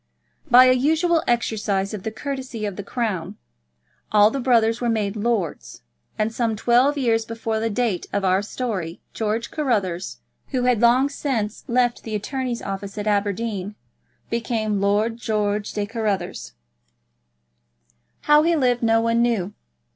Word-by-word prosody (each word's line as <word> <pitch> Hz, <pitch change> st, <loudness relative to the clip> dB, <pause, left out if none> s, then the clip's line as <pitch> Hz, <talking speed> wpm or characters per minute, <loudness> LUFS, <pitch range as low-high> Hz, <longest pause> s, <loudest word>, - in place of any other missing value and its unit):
By 250 Hz, +1 st, +8 dB
a 255 Hz, -, +6 dB
usual 320 Hz, +6 st, +2 dB
exercise 210 Hz, -4 st, 0 dB
of 210 Hz, -, -5 dB
the 220 Hz, -, -3 dB
courtesy 255 Hz, -1 st, -5 dB
of 200 Hz, -2 st, -4 dB
the 200 Hz, -, -5 dB
Crown, 205 Hz, -4 st, -3 dB, 0.7 s
all 210 Hz, 0 st, +6 dB
the 275 Hz, -, -2 dB
brothers 235 Hz, -2 st, +2 dB
were 240 Hz, -, 0 dB
made 210 Hz, -2 st, -1 dB
lords, 210 Hz, -, -2 dB, 0.3 s
and 215 Hz, +1 st, 0 dB
some 230 Hz, -2 st, 0 dB
twelve 245 Hz, +6 st, +3 dB
years 230 Hz, -4 st, +2 dB
before 225 Hz, -1 st, -3 dB
the 225 Hz, +1 st, -1 dB
date 220 Hz, -5 st, -1 dB
of 200 Hz, -1 st, -1 dB
our 185 Hz, +1 st, +3 dB
story 205 Hz, -6 st, -4 dB
George 220 Hz, +1 st, -2 dB
Carruthers, 200 Hz, -, -1 dB, 0.3 s
who 255 Hz, -3 st, -1 dB
had 250 Hz, -3 st, +2 dB
long 245 Hz, +3 st, +5 dB
since 250 Hz, -7 st, -3 dB
left 245 Hz, 0 st, +1 dB
the 220 Hz, -1 st, -5 dB
attorney's 250 Hz, +3 st, -3 dB
office 195 Hz, +1 st, -5 dB
at 205 Hz, -, -3 dB
Aberdeen, 205 Hz, -1 st, -1 dB, 0.6 s
became 225 Hz, -3 st, -1 dB
Lord 210 Hz, +3 st, +1 dB
George 210 Hz, -2 st, -1 dB
de 210 Hz, -, -2 dB
Bruce 215 Hz, -, -17 dB
Carruthers. 190 Hz, -, -2 dB, 1.7 s
How 295 Hz, 0 st, +5 dB
he 335 Hz, +2 st, +2 dB
lived 250 Hz, -5 st, +2 dB
no 225 Hz, -1 st, +3 dB
one 230 Hz, 0 st, +2 dB
knew. 215 Hz, -5 st, 0 dB
225 Hz, 150 wpm, -22 LUFS, 205-245 Hz, 1.7 s, By